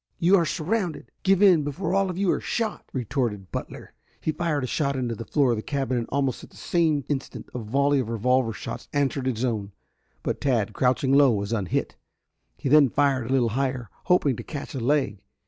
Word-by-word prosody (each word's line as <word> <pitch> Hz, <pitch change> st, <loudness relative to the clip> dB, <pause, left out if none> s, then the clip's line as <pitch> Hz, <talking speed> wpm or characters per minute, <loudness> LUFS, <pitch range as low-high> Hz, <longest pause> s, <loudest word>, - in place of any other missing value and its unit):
"You 180 Hz, +4 st, +4 dB
are 170 Hz, -4 st, +3 dB
surrounded. 185 Hz, +1 st, -2 dB
Give 195 Hz, 0 st, +3 dB
in 180 Hz, -6 st, +6 dB
before 145 Hz, +7 st, -3 dB
all 195 Hz, 0 st, +2 dB
of 180 Hz, -, -4 dB
you 195 Hz, -2 st, +2 dB
are -, -, -1 dB
shot!" 225 Hz, -3 st, -2 dB
retorted 120 Hz, -6 st, -2 dB
Butler. -, -, -7 dB, 0.3 s
He 155 Hz, -, -1 dB
fired 155 Hz, -4 st, -1 dB
a -, -, 0 dB
shot 140 Hz, +2 st, -1 dB
into 125 Hz, -3 st, -2 dB
the 115 Hz, +1 st, -7 dB
floor 140 Hz, -5 st, +2 dB
of 115 Hz, -, 0 dB
the -, -, -3 dB
cabin, 135 Hz, 0 st, -2 dB
and 120 Hz, -2 st, -1 dB
almost 135 Hz, -3 st, -1 dB
at -, -, -12 dB
the -, -, -18 dB
same 160 Hz, -5 st, +1 dB
instant 140 Hz, -3 st, -4 dB
a 125 Hz, -, -3 dB
volley 140 Hz, +5 st, +1 dB
of 120 Hz, -4 st, -2 dB
revolver 120 Hz, +1 st, +1 dB
shots 110 Hz, -, -7 dB
answered 140 Hz, -2 st, 0 dB
his 125 Hz, -1 st, 0 dB
own, 105 Hz, -5 st, -3 dB, 0.5 s
but -, -, -2 dB
Tad, 120 Hz, -7 st, +1 dB
crouching 130 Hz, +1 st, +2 dB
low, 140 Hz, -2 st, +6 dB
was 100 Hz, 0 st, -2 dB
unhit. 100 Hz, -6 st, -2 dB, 0.6 s
He -, -, -4 dB
then 145 Hz, -1 st, +6 dB
fired 135 Hz, -3 st, +1 dB
a -, -, -2 dB
little 125 Hz, -3 st, +3 dB
higher, 130 Hz, -2 st, -2 dB
hoping 165 Hz, -8 st, +3 dB
to -, -, -6 dB
catch 145 Hz, -3 st, -7 dB
a 135 Hz, -, -3 dB
leg. 125 Hz, -5 st, 0 dB
135 Hz, 210 wpm, -25 LUFS, 120-150 Hz, 0.6 s, in